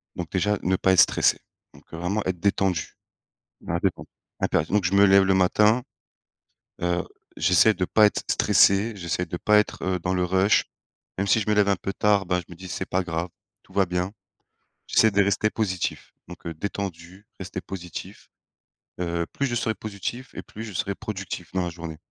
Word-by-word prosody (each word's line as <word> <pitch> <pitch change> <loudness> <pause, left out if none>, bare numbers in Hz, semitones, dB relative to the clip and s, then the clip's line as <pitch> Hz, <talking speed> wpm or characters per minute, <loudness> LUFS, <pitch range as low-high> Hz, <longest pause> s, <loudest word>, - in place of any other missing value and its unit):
Donc 85 -2 -6
déjà 105 +2 +1
ne 95 - +2
pas 95 - +3
être 90 - +7
stressé. - - +3 0.4
Donc - - -17
heu, - - -5
vraiment 95 +5 -1
être 90 -2 -2
détendu. 95 -3 0 0.7
Dans 85 - -5
la 85 - +1
détente. 95 0 -2 0.3
Impérati 80 - 0
donc 105 -2 +2
je 90 - 0
me 100 +1 +6
lève 95 0 +6
le 95 0 +3
matin. 105 +6 +3 1.0
Heu, 90 +1 0 0.3
j'essaie 90 +6 +4
de 90 - -1
pas 110 -1 +5
être - - -1
stressé, 100 +4 +4
j'essaie 90 0 -2
de 85 - -5
pas 105 +3 +4
être 95 -3 -1
dans 95 - -1
le 90 -1 +1
rush, 95 +3 +3 0.5
même 100 +1 -1
si 110 - +4
je 105 - -3
me - - +4
lève 100 -1 +3
un 100 - +3
peu 95 +2 -4
tard, 105 -2 +2
ben 90 0 0
je 85 - -9
me 85 - -9
dis: 95 +2 -10
«C'est 95 - -4
pas 95 +1 0
grave, 85 0 -3 0.3
tout - - -21
va 100 - +3
bien». 90 +2 -2 0.8
J'essaie 110 -1 +4
de 100 0 +3
rester 100 +2 +1
positif 95 -6 -3
donc 90 0 -12
heu, 85 - -4
détendu 95 +1 -6
rester 95 - -6
positif. 90 -3 -8 0.7
Heu, 85 -1 -1
plus 140 - -1
je 120 - -2
serai 110 -1 0
positif 110 +5 -6
et - - -6
plus 110 - -9
je 105 -3 -8
serais 100 +3 -2
productif 100 -5 -6
dans 95 -1 0
la 90 - -2
journée. 85 -2 -8
95 Hz, 200 wpm, -25 LUFS, 90-100 Hz, 1.0 s, être